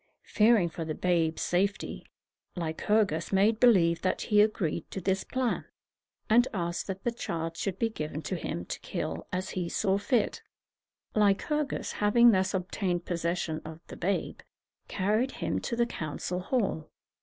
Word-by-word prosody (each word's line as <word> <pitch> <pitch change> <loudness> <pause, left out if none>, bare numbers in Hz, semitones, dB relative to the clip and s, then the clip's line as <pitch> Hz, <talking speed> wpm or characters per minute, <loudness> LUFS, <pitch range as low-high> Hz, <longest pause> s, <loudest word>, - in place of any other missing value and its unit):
Fearing 215 -4 +4
for 165 0 -5
the 155 -1 -4
babe's 165 -3 +1
safety, 195 +3 -1 0.5
Lycurgus 175 +1 0
made 205 +3 +3
believe 170 -9 +5
that 185 - 0
he 210 -2 +4
agreed 185 -7 0
to - - -5
this 190 +1 0
plan, 255 -2 -1 0.6
and 240 +3 +5
asked 170 -1 -2
that 195 -1 -5
the 240 - +1
child 165 -7 -4
should 190 +1 -3
be 230 - +1
given 155 -7 -5
to 190 - -2
him 85 - -4
to - - -5
kill 80 +1 -4
as 185 +1 -3
he 180 -2 -2
saw 195 +1 +1
fit. 220 +2 0 0.7
Lycurgus, 220 +8 +1
having 235 +3 +5
thus 190 -1 +1
obtained 180 -1 -2
possession 170 -2 -2
of 160 0 -9
the - - -7
babe, 195 +3 -2 0.5
carried 215 +7 0
him - - -2
to 235 - -3
the 235 0 +2
council 175 -3 -4
hall. 185 - -1
190 Hz, 155 wpm, -29 LUFS, 170-215 Hz, 0.7 s, believe